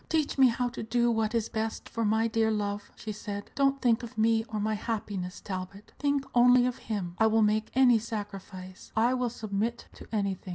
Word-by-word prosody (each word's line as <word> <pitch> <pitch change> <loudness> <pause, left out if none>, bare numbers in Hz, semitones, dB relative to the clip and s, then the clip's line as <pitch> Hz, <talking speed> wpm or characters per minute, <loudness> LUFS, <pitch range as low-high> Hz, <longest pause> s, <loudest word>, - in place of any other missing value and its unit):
"Teach 315 -3 +1
me 265 -1 +6
how 245 +1 0
to 240 - -7
do 235 +2 +1
what 220 0 0
is 230 -1 +1
best 220 0 -3
for 230 - -3
my 220 +1 +2
dear 225 0 +1
love," 205 -1 -2
she 220 - -6
said. 205 -1 -6
"Don't 275 0 +2
think 235 -2 +3
of 235 0 -9
me 225 0 +3
or 215 -2 -4
my 215 +1 0
happiness, 205 -4 -4
Talbot; 190 +1 -7
think 285 -1 +1
only 245 0 +6
of 250 +1 -2
him. 190 -5 -2
I 220 - +5
will 220 0 +3
make 215 +1 +1
any 250 -3 +6
sacrifice; 195 -4 -7
I 235 +3 +3
will 250 -1 0
submit 220 +1 -3
to - - -13
anything. 200 -3 -2
220 Hz, 205 wpm, -29 LUFS, 205-240 Hz, -, me